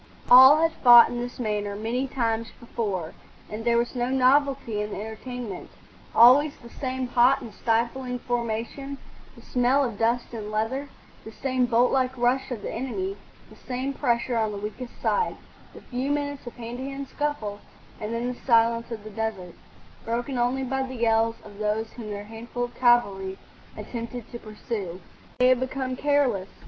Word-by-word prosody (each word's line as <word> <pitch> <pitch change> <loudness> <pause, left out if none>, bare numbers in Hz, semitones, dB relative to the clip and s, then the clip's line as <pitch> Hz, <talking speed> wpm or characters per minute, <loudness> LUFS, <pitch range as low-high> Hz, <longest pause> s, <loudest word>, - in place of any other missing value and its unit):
All 260 +4 +10
had 330 - +3
fought 240 -2 +9
in 240 - -4
this 245 +1 -6
manner 210 -3 -2
many 235 +5 -2
times 230 -3 -1
before, 200 -8 -3 0.4
and 215 +1 -5
there 235 0 +3
was 235 0 0
no 245 -1 -1
novelty 265 -3 +2
in 210 - -3
the - - -5
entertainment; 220 -1 -7 0.5
always 275 +6 +7
the 235 -1 -14
same 260 -1 -3
hot 250 +3 +4
and 225 - -9
stifling 240 +2 -1
formation, 240 +3 -3 0.4
the - - -15
smell 255 +2 +2
of 230 -5 -5
dust 235 +2 0
and 215 -2 -5
leather, 225 +7 -2 0.3
the 220 - -9
same 255 +1 0
boltlike 255 +2 +2
rush 250 +2 +1
of 235 -5 -5
the - - -4
enemy, 370 - -3 0.4
the - - -13
same 260 +2 -4
pressure 240 -2 0
on 220 -2 +1
the 205 - -5
weakest 215 +4 -7
side, 465 - 0 0.4
the - - -11
few 255 +2 -3
minutes 285 -2 -2
of 240 - -8
hand 240 0 -7
to 260 - -4
hand 275 0 -5
scuffle, 265 -9 -3 0.4
and 210 +1 -4
then 230 +1 -2
the 250 0 -5
silence 230 -1 +3
of 225 -3 -6
the 215 - -9
desert, 200 -5 -4 0.5
broken 240 +4 -2
only 245 +2 0
by 265 +1 -1
the 260 -1 -4
yells 225 -1 +2
of 205 -1 -13
those 215 +1 -1
whom 225 -3 -8
their 205 0 -5
handful 225 +3 -6
of 245 - -4
cavalry 200 -6 +2 0.4
attempted 235 -1 -6
to 235 - -7
pursue. 210 -5 -6 0.4
They 250 0 +5
had 255 -1 +4
become 260 0 -3
careless. 260 -9 +1
240 Hz, 175 wpm, -25 LUFS, 220-260 Hz, 0.5 s, All